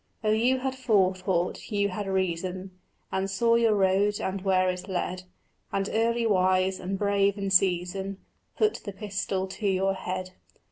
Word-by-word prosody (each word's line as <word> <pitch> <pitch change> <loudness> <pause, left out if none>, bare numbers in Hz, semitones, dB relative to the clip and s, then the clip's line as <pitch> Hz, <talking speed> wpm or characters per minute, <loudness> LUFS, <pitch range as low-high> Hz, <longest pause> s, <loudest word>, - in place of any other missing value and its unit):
Oh 215 - +2
you 245 +4 +2
had 265 0 -1
forethought, 190 -7 0
you 200 -1 +1
could 200 +2 -4
reason, 185 0 -2 0.4
And 190 +1 -1
saw 230 +4 +2
your 230 -2 +4
road 200 +1 +2
and 190 0 -3
where 185 -1 +2
it 180 +1 -3
led, 185 0 -3 0.5
And 195 0 -1
early 230 +1 +1
wise 185 -2 +2
and 190 +1 -3
brave 200 0 +2
in 195 -1 -3
season 190 +1 +1 0.4
Put 430 0 +1
the 200 - -6
pistol 195 -2 -3
to 200 +2 -4
your 195 0 +2
head. 185 -1 -4
195 Hz, 155 wpm, -27 LUFS, 185-205 Hz, 0.5 s, your